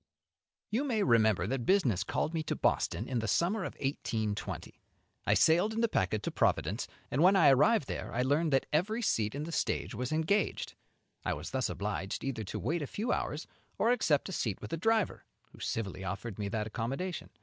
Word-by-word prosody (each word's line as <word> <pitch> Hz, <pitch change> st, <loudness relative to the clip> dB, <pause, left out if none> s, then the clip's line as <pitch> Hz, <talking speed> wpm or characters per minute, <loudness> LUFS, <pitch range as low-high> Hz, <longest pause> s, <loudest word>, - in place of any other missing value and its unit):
You 235 Hz, +6 st, +1 dB
may 235 Hz, -7 st, +1 dB
remember 110 Hz, -6 st, +4 dB
that 125 Hz, +3 st, -2 dB
business 130 Hz, -, +3 dB
called 160 Hz, -, -1 dB
me 165 Hz, -, 0 dB
to -, -, -1 dB
Boston 110 Hz, -, 0 dB
in 125 Hz, -3 st, -1 dB
the 110 Hz, -, -2 dB
summer 175 Hz, -, +2 dB
of -, -, -5 dB
1820. 110 Hz, -6 st, -3 dB, 0.5 s
I -, -, +5 dB
sailed 175 Hz, +7 st, +4 dB
in 225 Hz, -, 0 dB
the 230 Hz, -, +4 dB
packet 100 Hz, -, 0 dB
to -, -, -2 dB
Providence, -, -, +1 dB, 0.2 s
and 135 Hz, -, +1 dB
when 185 Hz, +3 st, +6 dB
I 190 Hz, -, +7 dB
arrived 150 Hz, -, +4 dB
there -, -, -4 dB
I 125 Hz, -, 0 dB
learned 150 Hz, +4 st, +2 dB
that 135 Hz, -1 st, +3 dB
every 215 Hz, +9 st, +1 dB
seat 110 Hz, -, +1 dB
in 145 Hz, -, -3 dB
the 165 Hz, -, -5 dB
stage -, -, -1 dB
was 125 Hz, 0 st, -3 dB
engaged. 160 Hz, +7 st, 0 dB, 0.5 s
I -, -, 0 dB
was 75 Hz, +3 st, -6 dB
thus 130 Hz, -1 st, 0 dB
obliged 100 Hz, -1 st, -3 dB
either 125 Hz, -5 st, -2 dB
to -, -, -5 dB
wait 160 Hz, +8 st, -1 dB
a 145 Hz, -, -3 dB
few 220 Hz, -, -2 dB
hours -, -, -2 dB, 0.3 s
or 230 Hz, -, +3 dB
accept 165 Hz, -, +2 dB
a -, -, -5 dB
seat 110 Hz, -, -2 dB
with 105 Hz, -, -8 dB
the -, -, -1 dB
driver, 220 Hz, +3 st, +1 dB, 0.3 s
who -, -, -16 dB
civilly 95 Hz, -4 st, -3 dB
offered 100 Hz, +3 st, -5 dB
me 100 Hz, -1 st, -2 dB
that 105 Hz, +1 st, -1 dB
accommodation. 135 Hz, -, -3 dB
135 Hz, 205 wpm, -31 LUFS, 110-185 Hz, 0.5 s, I